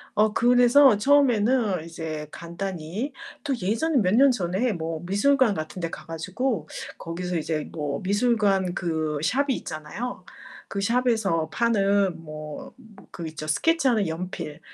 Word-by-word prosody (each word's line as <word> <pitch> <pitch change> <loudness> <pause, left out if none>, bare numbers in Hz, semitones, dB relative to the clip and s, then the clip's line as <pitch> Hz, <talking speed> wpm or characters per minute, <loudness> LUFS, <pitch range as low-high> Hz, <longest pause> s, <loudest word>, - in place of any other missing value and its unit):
어 215 0 +3
그래서 245 0 +6
처음에는 235 - +3
이제 160 -2 -6
간단히 180 - -5 0.3
또 275 - 0
예전에 230 - 0
몇 190 +1 +2
년 275 0 +7
전에 200 +2 0
뭐 165 -1 -4
미술관 230 +4 +3
같은 155 +2 -5
데 165 -1 -2
가 - - -8
가지고 185 - -2 0.3
거기서 175 +1 -4
이제 155 -1 -3
뭐 145 -1 -3
미술관 200 -3 +2
그 160 -4 -2
샵이 275 - +1
있잖아요. 155 +11 -6 0.4
그 200 - -3
샵에서 220 -8 +1
파는 200 -6 +2
뭐, 155 -1 -8
뭐 220 -6 -17
그 170 -2 -6
있죠 155 -1 -7
스케치하는 255 - +2
연필. 160 -2 -5
195 Hz, 270 characters per minute, -25 LUFS, 165-240 Hz, 0.4 s, 년